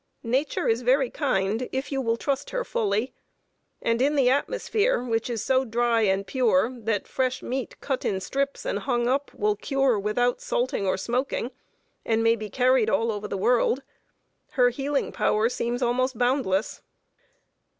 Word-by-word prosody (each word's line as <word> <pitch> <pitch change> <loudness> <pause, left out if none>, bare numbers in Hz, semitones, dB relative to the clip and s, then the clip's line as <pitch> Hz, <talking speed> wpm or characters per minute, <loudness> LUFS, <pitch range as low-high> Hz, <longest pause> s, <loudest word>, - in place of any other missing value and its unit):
Nature 260 +5 0
is 230 +2 +2
very 255 +1 +2
kind, 225 -4 0
if 265 +2 -3
you 270 -1 0
will 230 -2 0
trust 275 +2 -2
her - - -2
fully; 215 - -1 0.7
and 230 +1 +1
in 290 +3 +2
the 260 -3 +4
atmosphere, 435 - 0
which 230 -1 -1
is 230 -3 -2
so 260 0 +2
dry 235 -1 +1
and 195 -1 +1
pure 235 0 +2
that 225 -4 -2
fresh 255 -1 -1
meat, 260 0 -4
cut 265 -2 -2
in 190 - 0
strips 275 +9 -2
and - - -1
hung 240 -3 0
up, 275 +3 0
will 210 0 +1
cure 270 0 +1
without 240 +4 0
salting 240 -5 -1
or 185 - +1
smoking, 250 0 -2 0.5
and 225 0 +1
may 230 0 +4
be 215 -2 -6
carried 250 0 +3
all 225 +1 +1
over 210 0 -4
the 200 - -3
world, 245 +5 +2 0.7
her 250 -2 +4
healing 275 +3 -1
power 215 +1 +2
seems 245 +1 -2
almost 255 +1 0
boundless. 245 -5 0
245 Hz, 165 wpm, -25 LUFS, 225-265 Hz, 0.7 s, the